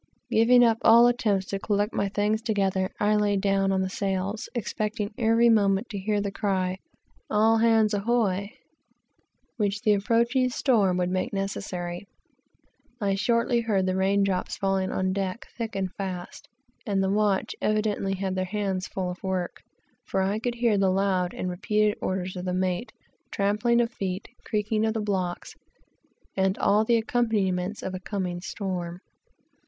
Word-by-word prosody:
Giving 245 +2 +5
up 225 -1 +3
all 235 +1 +7
attempts 215 -6 +1
to 195 - -2
collect 205 +1 0
my 200 - 0
things 210 +2 0
together, 195 -4 0
I 210 +1 +3
lay 205 -1 +2
down 195 0 +1
upon 190 0 +1
the 190 - -2
sails, 195 +2 -2
expecting 215 -1 -3
every 230 +1 +3
moment 205 -1 +3
to 205 - -4
hear 205 +2 0
the 200 -1 -2
cry 190 -3 0
of 185 - -6 0.5
"all 220 +1 +4
hands, 225 -2 +3
ahoy," 200 -2 0 1.1
which 205 -1 -1
the 215 -3 +4
approaching 235 +5 +2
storm 215 -8 +2
would 180 0 0
soon - - -3
make 185 +1 -2
necessary. 190 -2 -4 0.9
I 200 -3 +1
shortly 235 +3 +1
heard 205 -5 +1
the 185 0 0
rain 195 +1 +2
drops 190 -2 -1
falling 195 -2 0
on 185 0 0
deck, 195 +2 -3
thick 225 -2 -4
and 190 -2 -2
fast, 185 -3 -6 0.3
and 195 -2 0
the 190 - +1
watch 205 -1 +1
evidently 210 -2 0
had 190 0 -2
their 185 0 -1
hands 195 -1 -2
full 185 -2 -3
of 180 - -10
work, 185 -2 -3 0.5
for 190 -1 0
I 200 +3 0
could 240 +1 -2
hear 235 -4 +2
the 195 -1 +3
loud 185 -2 +1
and 185 - -3
repeated 210 +4 +1
orders 185 0 -2
of 180 0 -5
the 180 0 -1
mate, 185 +4 -1 0.3
the - - -44
trampling 210 +4 +1
of 235 0 +1
feet, 190 -3 -4
the - - -19
creaking 215 0 0
of 220 0 0
blocks, 185 -4 -2 0.8
and 190 0 +1
all 210 +2 +3
the 235 +1 +3
accompaniments 210 -5 0
of 190 - -4
a 185 - -4
coming 185 -3 -4
storm. 180 -2 -4
200 Hz, 170 wpm, -26 LUFS, 190-220 Hz, 1.1 s, all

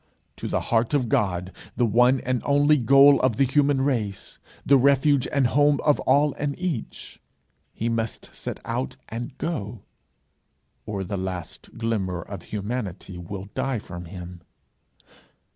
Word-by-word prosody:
To - - -5
the - - -1
heart 115 +5 +2
of 125 -5 0
God, 90 -3 0 0.2
the 120 - +2
one 125 +4 +4
and 125 -1 -1
only 145 +1 +4
goal 140 +3 +6
of 130 -4 +2
the 135 - +3
human 140 +1 +2
race 115 -8 -2 0.3
the 140 - +6
refuge 140 +1 +3
and 140 -2 +2
home 145 +3 +3
of 150 - +3
all 145 +2 +3
and 140 -1 -2
each, 175 -10 -5 0.5
he 115 - -3
must 115 -1 -3
set - - -6
out 65 - -3
and 120 +4 -6
go, 110 - -4 1.0
or 100 -2 -3
the 100 +2 -4
last 90 -2 -6
glimmer 100 -6 -2
of 100 -3 -8
humanity 100 -4 -5
will 95 +3 -7
die 135 -2 -1
from 90 -4 -8
him. 90 0 -9
120 Hz, 145 wpm, -24 LUFS, 100-140 Hz, 1.0 s, goal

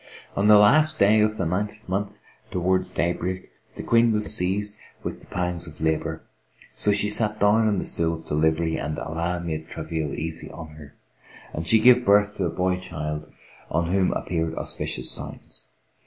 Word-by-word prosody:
On 100 +1 +2
the 105 0 +8
last 155 +10 +5
day 105 +2 +5
of 110 0 +1
the - - -1
ninth 105 +5 -3
month, 100 +2 -3 0.3
towards 95 +1 0
day 85 +1 0
break, 95 +1 -5 0.2
the - - -6
Queen 115 0 +4
was 105 -1 +3
seized 105 +4 -1 0.2
with - - -5
the - - -16
pangs 90 -1 -3
of 75 - -12
labour; 80 0 -1 0.5
so 105 - +2
she 105 0 +1
sat 105 0 0
down 105 +2 +4
on 105 - +2
the - - -2
stool 85 0 0
of 80 - -12
delivery 80 +2 +1
and 75 +2 -3
Allah 85 +2 -2
made 80 -2 -4
the - - -19
travail 80 -3 -3
easy 80 +1 -4
to - - -11
her 75 -3 -11 0.6
and 80 +2 -4
she 115 - +5
gave 125 +2 +6
birth 105 0 +4
to 95 - 0
a - - 0
boy 90 +2 0
child, 75 -3 -5 0.4
on 85 0 0
whom 95 -1 +2
appeared 80 -2 -2
auspicious 65 +1 -3
signs. - - -8
90 Hz, 185 wpm, -24 LUFS, 80-105 Hz, 0.6 s, the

